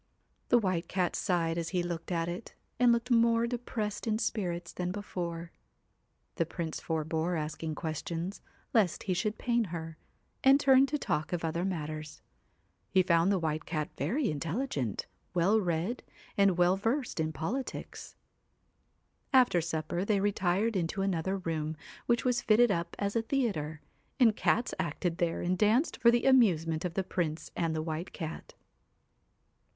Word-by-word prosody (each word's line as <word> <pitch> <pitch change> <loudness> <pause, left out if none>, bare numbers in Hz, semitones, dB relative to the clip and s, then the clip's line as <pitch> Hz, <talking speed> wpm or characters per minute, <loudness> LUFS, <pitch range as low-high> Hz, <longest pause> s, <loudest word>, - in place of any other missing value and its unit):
The 245 - +6
White 185 -6 0
Cat 185 -2 0
sighed 170 -3 0
as 165 - -3
he 180 -2 0
looked 170 0 -4
at 165 -1 0
it, 175 +6 -6 0.2
and 245 -1 +6
looked 235 +2 0
more 230 0 +4
depressed 235 -3 -3
in 215 -1 +2
spirits 180 -7 -2
than 180 0 -2
before. 175 -4 -5 0.9
The 165 - +2
Prince 165 -2 -4
forbore 160 +2 -1
asking 155 +1 -3
questions, 165 +4 -4 0.3
lest 205 -8 +2
he 185 - 0
should 210 +5 -1
pain 235 -2 +1
her, 165 -3 -6 0.4
and 270 +1 +7
turned 270 -1 +6
to 295 +2 -1
talk 155 - -2
of 175 -2 -1
other 170 +2 -1
matters. 155 -4 -4 0.7
He 185 - +4
found 170 +1 +3
the 195 - +3
White 155 -2 -2
Cat 155 -2 -2
very 270 - 0
intelligent, 155 - -2 0.3
well 190 +6 +4
read, 175 +6 -1 0.3
and 200 -3 +4
well 180 +2 +4
versed 235 - -1
in 160 0 0
politics. 200 - -5 1.2
After 250 - +5
supper 160 +2 -2
they 205 0 +2
retired 200 +2 +1
into 185 +2 -1
another 190 0 0
room, 160 -3 -3 0.3
which 235 0 +2
was 250 -1 +2
fitted 230 +1 +5
up 170 -2 -2
as 200 +1 -2
a 230 - +3
theatre, 200 - -1 0.4
and 225 -4 +6
cats 235 +2 +1
acted 170 0 -2
there 170 -2 0
and 180 +1 +1
danced 220 - +2
for 235 - +5
the 235 0 +3
amusement 175 -11 +4
of 175 - -3
the 195 - +1
Prince 165 -4 -3
and 165 -2 0
the 155 - -1
White 160 +2 -4
Cat. 160 -2 -7
180 Hz, 155 wpm, -31 LUFS, 165-220 Hz, 1.2 s, and